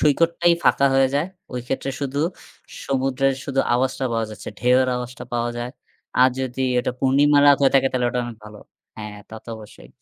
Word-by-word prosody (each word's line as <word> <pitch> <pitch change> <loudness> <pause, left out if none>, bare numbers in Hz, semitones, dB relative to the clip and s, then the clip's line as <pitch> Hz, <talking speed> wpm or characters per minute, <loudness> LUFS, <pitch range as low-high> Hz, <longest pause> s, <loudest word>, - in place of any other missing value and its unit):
সৈকতটাই 170 +3 +3
ফাঁকা 140 - +4
হয়ে 135 0 +4
যায়। 145 +4 +1 0.3
ওই 125 - -3
ক্ষেত্রে 135 +1 -2
শুধু 140 0 -3 0.7
সমুদ্রের 135 0 0
শুধু 135 -1 0
আওয়াজটা 130 +2 0
পাওয়া 115 -1 -1
যাচ্ছে, 105 -3 -9
ঢেউয়ের 125 +1 +3
আওয়াজটা 125 0 -7
পাওয়া 120 0 -1
যায়। 120 +1 -4 0.5
আর 130 - +7
যদি 130 0 -4 0.2
এটা - - 0
পূর্ণিমা 140 +2 +4
রাত 140 - +7
হয়ে 135 - +4
থাকে 135 0 +4
তাহলে 125 -1 +1
ওটা 125 0 -1
অনেক 120 -1 -7
ভালো। 105 0 -11 0.4
হ্যাঁ, 105 -1 -7
তা - - -10
তো - - -16
অবশ্যই। 105 - -14
130 Hz, 185 wpm, -22 LUFS, 120-135 Hz, 0.7 s, আর